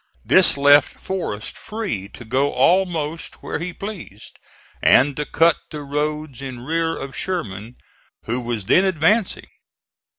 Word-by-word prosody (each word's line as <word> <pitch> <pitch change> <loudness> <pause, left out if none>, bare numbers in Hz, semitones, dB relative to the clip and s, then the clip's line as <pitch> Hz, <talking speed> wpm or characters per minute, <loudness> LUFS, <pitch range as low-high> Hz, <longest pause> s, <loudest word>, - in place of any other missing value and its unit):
This - - +5
left 145 0 +5
Forrest 170 - -4
free 210 - -5
to 120 - -12
go 135 +5 +1
almost 170 -4 0
where - - -3
he 180 +3 -4
pleased, 180 - -9 0.4
and 140 +2 +5
to 150 - -3
cut 165 0 +3
the 150 -1 -7
roads 150 -1 -3
in 130 -3 -7
rear 165 +2 -1
of 135 -1 -7
Sherman 115 - -4 0.5
who 120 +3 -2
was 115 -4 -3
then 185 - +4
advancing. 190 +4 +1
150 Hz, 135 wpm, -21 LUFS, 125-175 Hz, 0.5 s, This